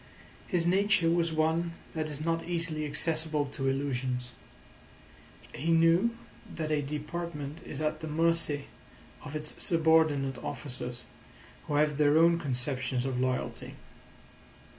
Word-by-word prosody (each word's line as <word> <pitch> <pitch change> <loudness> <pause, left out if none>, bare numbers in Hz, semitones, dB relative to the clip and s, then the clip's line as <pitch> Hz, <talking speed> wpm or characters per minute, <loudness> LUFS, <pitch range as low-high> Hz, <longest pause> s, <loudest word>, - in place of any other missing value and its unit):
His 175 -2 +1
nature 185 -2 +3
was 170 -1 +2
one 160 +2 +1 0.2
that 155 -1 -2
is 150 +1 -5
not 165 0 0
easily 165 -3 -1
accessible 155 0 0
to 135 - -2
illusions. 130 -2 -1 1.2
He 160 - -3
knew 165 +8 +4 0.4
that 155 -2 -3
a 150 -1 +2
department 150 0 -5
is 150 - -6
at 155 0 -1
the 160 - -6
mercy 160 -2 +1 0.6
of 145 +1 -7
its 150 0 -2
subordinate 160 -5 +3
officers, 125 -3 -5 0.6
who 145 - -1
have 150 0 +2
their 150 0 +5
own 170 +1 +5
conceptions 130 -3 -1
of 130 -2 -1
loyalty. 130 0 -2
155 Hz, 125 wpm, -30 LUFS, 140-165 Hz, 1.2 s, their